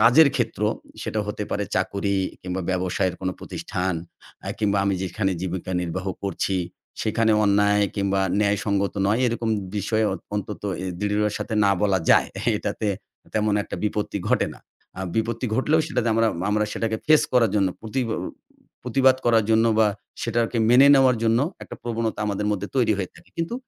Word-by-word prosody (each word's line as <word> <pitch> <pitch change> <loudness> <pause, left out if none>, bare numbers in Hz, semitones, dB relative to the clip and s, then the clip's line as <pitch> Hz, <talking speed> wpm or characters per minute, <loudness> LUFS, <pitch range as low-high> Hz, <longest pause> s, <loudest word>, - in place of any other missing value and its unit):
কাজের 125 +8 +7
ক্ষেত্র 115 -4 -2 0.4
সেটা 110 - -2
হতে 105 0 -4
পারে 105 - -1
চাকুরী 100 +1 0 0.3
কিংবা 90 +1 -3
ব্যবসায়ের 95 0 0
কোনো 95 -1 -1
প্রতিষ্ঠান 90 -1 -3 0.5
এ্যাঁ - - -4
কিংবা 100 -2 +1
আমি 100 -1 +1
যেখানে 95 +1 -1
জীবিকা 95 0 -4
নির্বাহ 90 +2 -4 0.2
করছি 95 0 -1 0.4
সেখানে 110 +1 +2
অন্যায় 105 0 +3
কিংবা 100 -1 +1 0.2
ন্যায়সঙ্গত 100 -1 0
নয় 105 +5 +2
এরকম 115 -1 -1 0.3
বিষয় 110 +2 +1
অয় 95 - -3 0.2
অন্তত 105 0 -4 0.4
দৃঢ়ের 105 0 +1
সাথে 110 - -4
না 100 - +4
বলা 100 -2 +3
যায়। - - +5 0.3
এটাতে, 110 - -3 0.5
তেমন 105 -1 +2
একটা - - -6
বিপত্তি 105 0 -1
ঘটে - - +2
না। - - -15 0.4
এ্যাঁ 95 +1 -4
বিপত্তি 115 +2 -1
ঘটলেও 150 +5 +3
সেটাতে 125 -6 -1
আমরা, 115 0 +3 0.2
আমরা 105 +1 +2
সেটাকে 110 -1 -1
ফেস 155 0 +6
করার 120 -4 +4
জন্য 100 -2 +3
প্রতিব 120 +3 -2 0.8
প্রতিবাদ 130 +1 +3
করার 115 -2 +4
জন্য 110 0 +4
বা 110 - +6 0.4
সেটাকে 115 0 0
মেনে 130 +3 +7
নেওয়ার 130 -2 +5
জন্য, 115 0 +3 0.2
একটা - - -8
প্রবণতা 115 -1 -2
আমাদের 105 0 -1
মধ্যে 100 -1 -2
তৈরি 120 -4 +3
হয়ে 95 -3 -3
থাকে। 85 - -18
কিন্তু 165 +8 -2
105 Hz, 160 wpm, -24 LUFS, 100-115 Hz, 0.8 s, কাজের